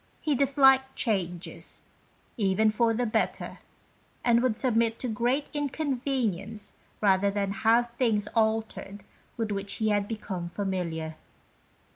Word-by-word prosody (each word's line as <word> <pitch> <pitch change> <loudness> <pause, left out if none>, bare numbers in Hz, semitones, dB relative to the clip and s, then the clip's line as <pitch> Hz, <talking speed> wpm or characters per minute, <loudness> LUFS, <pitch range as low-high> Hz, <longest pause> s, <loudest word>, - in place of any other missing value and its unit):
He 305 - 0
disliked 270 -1 +4
changes, 180 -6 -3 0.5
even 210 +1 +2
for 230 +2 +2
the 240 +2 0
better, 220 - -1 0.7
and 235 -1 +5
would 250 -3 +2
submit 230 -2 +1
to 255 - -4
great 245 +5 0
inconvenience 255 - -2 0.3
rather 200 -1 +4
than 200 -1 -1
have 230 +4 +3
things 220 -5 +2
altered 220 -3 -1 0.3
with 225 -2 -1
which 200 0 -3
he 220 -1 0
had 205 -1 +1
become 190 -6 -4
familiar. 170 -5 -3
220 Hz, 120 wpm, -28 LUFS, 200-245 Hz, 0.7 s, and